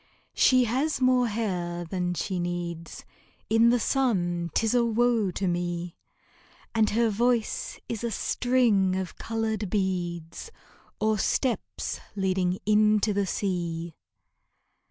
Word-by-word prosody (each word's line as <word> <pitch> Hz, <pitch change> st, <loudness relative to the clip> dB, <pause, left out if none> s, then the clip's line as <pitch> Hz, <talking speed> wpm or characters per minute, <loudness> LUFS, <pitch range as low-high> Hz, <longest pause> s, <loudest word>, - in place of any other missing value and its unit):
She 255 Hz, -1 st, +5 dB
has 265 Hz, +7 st, 0 dB
more 255 Hz, -1 st, +3 dB
hair 180 Hz, -6 st, -2 dB
than 180 Hz, 0 st, -2 dB
she 185 Hz, +1 st, -2 dB
needs; 175 Hz, -1 st, -5 dB, 0.5 s
In 225 Hz, +1 st, +5 dB
the 245 Hz, +1 st, +3 dB
sun 175 Hz, -10 st, 0 dB
'tis 225 Hz, 0 st, +2 dB
a 245 Hz, -1 st, +4 dB
woe 235 Hz, -2 st, +2 dB
to 190 Hz, +2 st, -2 dB
me! 175 Hz, -1 st, -2 dB, 0.8 s
And 220 Hz, -2 st, +3 dB
her 230 Hz, +1 st, +2 dB
voice 235 Hz, +1 st, 0 dB
is 230 Hz, -1 st, -4 dB
a 235 Hz, -, 0 dB
string 225 Hz, -4 st, +2 dB
of 185 Hz, -2 st, -4 dB
colored 220 Hz, -3 st, -2 dB
beads, 175 Hz, -, -2 dB, 0.5 s
Or 215 Hz, -1 st, +1 dB
steps 250 Hz, +4 st, -1 dB, 0.2 s
leading 185 Hz, -2 st, 0 dB
into 215 Hz, 0 st, +3 dB
the 200 Hz, -1 st, 0 dB
sea. 170 Hz, -4 st, -2 dB
205 Hz, 120 wpm, -27 LUFS, 175-230 Hz, 0.8 s, She